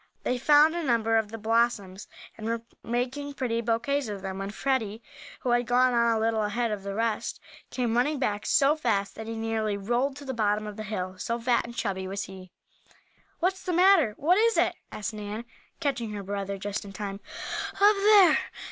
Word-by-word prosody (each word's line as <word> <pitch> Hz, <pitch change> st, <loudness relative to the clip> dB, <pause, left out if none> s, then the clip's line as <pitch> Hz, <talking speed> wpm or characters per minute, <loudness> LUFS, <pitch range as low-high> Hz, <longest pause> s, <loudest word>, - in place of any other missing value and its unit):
They 250 Hz, -, 0 dB
found 300 Hz, +4 st, +6 dB
a 345 Hz, -, -1 dB
number 230 Hz, -6 st, +1 dB
of 220 Hz, -2 st, +1 dB
the 225 Hz, -, -6 dB
blossoms, 220 Hz, -3 st, 0 dB, 0.3 s
and 220 Hz, -, -6 dB
were 230 Hz, 0 st, -2 dB, 0.2 s
making 260 Hz, +4 st, -3 dB
pretty 235 Hz, -4 st, -1 dB
bouquets 240 Hz, +4 st, 0 dB
of 200 Hz, -2 st, -6 dB
them, 190 Hz, 0 st, -4 dB
when 195 Hz, 0 st, -4 dB
Freddie, 225 Hz, -2 st, -1 dB, 0.4 s
who 250 Hz, -, 0 dB
had 240 Hz, -1 st, +2 dB
gone 250 Hz, +1 st, +4 dB
on 235 Hz, -1 st, +3 dB
a -, -, -1 dB
little 225 Hz, 0 st, +1 dB
ahead 220 Hz, +2 st, -1 dB
of 210 Hz, -2 st, -3 dB
the 195 Hz, 0 st, -5 dB
rest, 225 Hz, 0 st, -1 dB, 0.3 s
came 240 Hz, -3 st, -1 dB
running 285 Hz, +5 st, +2 dB
back 210 Hz, -6 st, -1 dB
so 280 Hz, +2 st, +4 dB
fast 200 Hz, -9 st, 0 dB
that 220 Hz, 0 st, -8 dB
he 225 Hz, -, -4 dB
nearly 225 Hz, -2 st, -1 dB
rolled 240 Hz, +7 st, 0 dB
to 285 Hz, 0 st, -10 dB
the 265 Hz, -, -3 dB
bottom 215 Hz, -2 st, 0 dB
of 210 Hz, -1 st, -6 dB
the 215 Hz, -, -6 dB
hill, 185 Hz, -3 st, -4 dB
so 235 Hz, +4 st, -2 dB
fat 240 Hz, 0 st, +1 dB
and 235 Hz, 0 st, -9 dB
chubby 190 Hz, -3 st, -2 dB
was 195 Hz, +1 st, -3 dB
he. 190 Hz, -1 st, -10 dB, 0.9 s
"What's 375 Hz, +2 st, +1 dB
the 365 Hz, -1 st, -3 dB
matter? 350 Hz, -, +5 dB
What 355 Hz, +7 st, +3 dB
is 460 Hz, +1 st, +3 dB
it?" -, -, +3 dB, 0.2 s
asked 210 Hz, +1 st, -4 dB
Nan, 210 Hz, +2 st, -6 dB, 0.3 s
catching 250 Hz, -8 st, -2 dB
her 205 Hz, -1 st, -5 dB
brother 200 Hz, 0 st, -3 dB
just 205 Hz, +1 st, -4 dB
in 200 Hz, -1 st, -10 dB
time. 200 Hz, -1 st, -5 dB, 0.6 s
"Up 410 Hz, +1 st, +6 dB
there!" 395 Hz, -4 st, +6 dB
230 Hz, 200 wpm, -27 LUFS, 205-260 Hz, 0.9 s, found